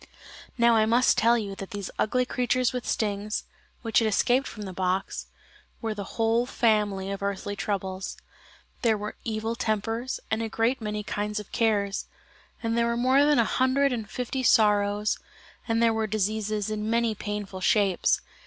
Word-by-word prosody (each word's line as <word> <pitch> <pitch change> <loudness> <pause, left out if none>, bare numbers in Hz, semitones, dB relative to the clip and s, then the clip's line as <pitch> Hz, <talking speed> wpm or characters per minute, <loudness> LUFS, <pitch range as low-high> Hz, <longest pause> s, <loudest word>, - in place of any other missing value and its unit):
Now 235 0 +5
I 215 0 +3
must 240 +3 +4
tell 235 +2 +4
you 205 -3 -3
that 195 - -7
these 205 -3 -5
ugly 250 +3 +2
creatures 250 0 0
with 250 -1 -4
stings, 210 0 -1 0.4
which 225 -2 +3
had 225 - +1
escaped 245 +5 +2
from 210 - -7
the 190 -2 -6
box, 185 +1 -2 0.5
were 225 -2 -2
the 200 -2 -7
whole 230 +2 +2
family 210 -5 +1
of 200 - -5
earthly 200 0 -3
troubles. 195 -1 -3 0.6
There 225 -3 +3
were 210 +1 -5
evil 225 0 -2
tempers, 225 +3 -2
and 220 +1 +1
a 225 - -2
great 230 +4 0
many 210 -1 -3
kinds 210 +1 -2
of 210 - -10
cares: 205 -4 0 0.6
and 230 0 0
there 235 0 +2
were 235 0 0
more 260 +3 +4
than 295 0 +4
a 235 - +4
hundred 260 +3 +2
and 220 -3 -4
fifty 250 +3 -3
sorrows, 210 -3 +3 0.5
and 230 0 +2
there 230 -1 +4
were 220 0 0
diseases 215 0 -1
in 215 0 -2
many 230 -1 +2
painful 205 -2 -5
shapes. 195 -2 +2
220 Hz, 170 wpm, -27 LUFS, 205-235 Hz, 0.6 s, Now